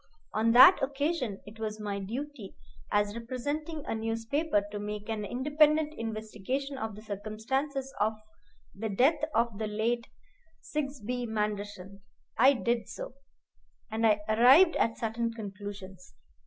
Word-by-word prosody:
On 225 Hz, +1 st, +2 dB
that 260 Hz, +10 st, +9 dB
occasion 275 Hz, -, -1 dB
it 210 Hz, +2 st, -12 dB
was 215 Hz, -1 st, -4 dB
my 205 Hz, -1 st, -3 dB
duty, 240 Hz, +2 st, -6 dB, 0.4 s
as 205 Hz, +1 st, +1 dB
representing 285 Hz, +6 st, -4 dB
a -, -, -2 dB
newspaper, 225 Hz, +3 st, 0 dB
to 205 Hz, -, -4 dB
make 210 Hz, 0 st, -5 dB
an 220 Hz, -2 st, -2 dB
independent 300 Hz, +6 st, +2 dB
investigation 225 Hz, +5 st, -4 dB
of 220 Hz, -5 st, -4 dB
the 215 Hz, -, -11 dB
circumstances 260 Hz, +7 st, -3 dB
of 215 Hz, +1 st, +2 dB, 0.6 s
the 220 Hz, +3 st, -4 dB
death 260 Hz, +11 st, +3 dB
of 230 Hz, -2 st, +1 dB
the 215 Hz, -, -1 dB
late 230 Hz, +3 st, -1 dB, 0.5 s
Sigsbee 250 Hz, -5 st, -3 dB
Manderson. 205 Hz, -3 st, -4 dB, 0.3 s
I 260 Hz, +5 st, +6 dB
did 235 Hz, -3 st, -1 dB
so, -, -, -7 dB, 0.8 s
and 225 Hz, +1 st, +2 dB
I 210 Hz, -1 st, +3 dB
arrived 255 Hz, +11 st, +6 dB
at 225 Hz, -, +1 dB
certain 230 Hz, +1 st, -2 dB
conclusions. 195 Hz, -3 st, -8 dB
225 Hz, 130 wpm, -30 LUFS, 210-270 Hz, 0.8 s, that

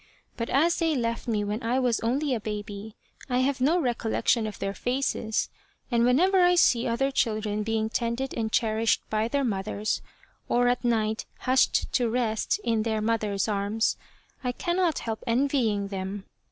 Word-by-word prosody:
But 230 Hz, -1 st, -4 dB
as 320 Hz, +6 st, +2 dB
they 325 Hz, -2 st, +1 dB
left 230 Hz, -2 st, -2 dB
me 215 Hz, -3 st, 0 dB
when 210 Hz, +3 st, -3 dB
I 235 Hz, +3 st, 0 dB
was 245 Hz, -3 st, +1 dB
only 265 Hz, +5 st, 0 dB
a 235 Hz, -, 0 dB
baby 210 Hz, 0 st, -6 dB, 0.3 s
I 250 Hz, 0 st, +2 dB
have 265 Hz, 0 st, 0 dB
no 315 Hz, +7 st, +3 dB
recollection 235 Hz, -4 st, +1 dB
of 215 Hz, -, -7 dB
their 195 Hz, 0 st, -3 dB
faces, 245 Hz, -2 st, -1 dB, 0.4 s
and 235 Hz, -1 st, +3 dB
whenever 365 Hz, +10 st, +4 dB
I 355 Hz, 0 st, +5 dB
see 250 Hz, -7 st, +4 dB
other 260 Hz, +4 st, 0 dB
children 215 Hz, -4 st, 0 dB
being 220 Hz, 0 st, 0 dB
tended 235 Hz, +3 st, -2 dB
and 220 Hz, -1 st, -2 dB
cherished 220 Hz, 0 st, +1 dB
by 215 Hz, +1 st, +1 dB
their 280 Hz, +3 st, 0 dB
mothers, 210 Hz, -1 st, -1 dB, 0.5 s
or 245 Hz, 0 st, +3 dB
at 245 Hz, +1 st, 0 dB
night 220 Hz, -2 st, 0 dB
hushed 255 Hz, 0 st, +2 dB
to 245 Hz, -3 st, +2 dB
rest 230 Hz, -, 0 dB
in 225 Hz, -2 st, +1 dB
their 220 Hz, 0 st, -1 dB
mother's 215 Hz, -2 st, 0 dB
arms, 210 Hz, +1 st, 0 dB, 0.5 s
I 250 Hz, -1 st, -1 dB
cannot 345 Hz, +1 st, 0 dB
help 225 Hz, -1 st, -4 dB
envying 230 Hz, -5 st, +1 dB
them. 195 Hz, 0 st, -5 dB
230 Hz, 165 wpm, -27 LUFS, 215-255 Hz, 0.5 s, I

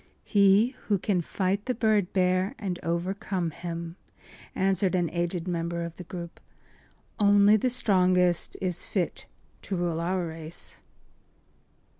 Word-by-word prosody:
“He 200 Hz, +2 st, +5 dB, 0.2 s
who 205 Hz, -, +3 dB
can 185 Hz, -1 st, 0 dB
fight 190 Hz, +4 st, -1 dB
the 255 Hz, -, -1 dB
bird 215 Hz, -5 st, +2 dB
bear 185 Hz, +4 st, +1 dB
and 185 Hz, -4 st, -4 dB
overcome 175 Hz, +1 st, -2 dB
him,” 170 Hz, +1 st, -6 dB, 0.6 s
answered 190 Hz, 0 st, +2 dB
an 175 Hz, -2 st, 0 dB
aged 175 Hz, 0 st, -2 dB
member 170 Hz, -1 st, -2 dB
of 170 Hz, 0 st, -8 dB
the 180 Hz, -, -7 dB
group. 170 Hz, -1 st, -8 dB, 0.8 s
“Only 205 Hz, 0 st, +6 dB
the 235 Hz, +4 st, +1 dB
strongest 185 Hz, -7 st, +2 dB
is 180 Hz, -2 st, -1 dB
fit 185 Hz, -4 st, -2 dB, 0.3 s
to 195 Hz, -, -4 dB
rule 170 Hz, -2 st, -1 dB
our 180 Hz, +1 st, -1 dB
race. 160 Hz, 0 st, -6 dB
180 Hz, 130 wpm, -27 LUFS, 170-200 Hz, 0.8 s, Only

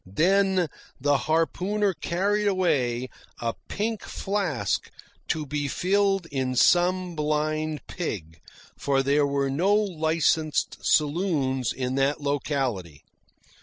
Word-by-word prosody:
Then 190 Hz, +1 st, +3 dB, 0.3 s
the 145 Hz, +2 st, +2 dB
harpooner 190 Hz, +5 st, +1 dB
carried 200 Hz, +5 st, 0 dB
away 130 Hz, -11 st, +1 dB, 0.3 s
a 115 Hz, -1 st, -1 dB
pink 220 Hz, +1 st, -2 dB
flask 160 Hz, -, -2 dB, 0.4 s
to 155 Hz, -1 st, -1 dB
be 145 Hz, 0 st, -2 dB
filled 195 Hz, +4 st, +1 dB
in 130 Hz, -2 st, -1 dB
some 180 Hz, +4 st, +3 dB
blind 155 Hz, -1 st, -1 dB
pig, 85 Hz, -, -5 dB, 0.4 s
for 135 Hz, -1 st, +1 dB
there 140 Hz, +1 st, +3 dB
were 140 Hz, -1 st, 0 dB
no 185 Hz, +9 st, +2 dB
licensed 160 Hz, -5 st, +1 dB
saloons 145 Hz, -, +1 dB
in 130 Hz, 0 st, -3 dB
that 140 Hz, +3 st, +1 dB
locality. 135 Hz, -, -2 dB
155 Hz, 105 wpm, -26 LUFS, 135-185 Hz, 0.4 s, Then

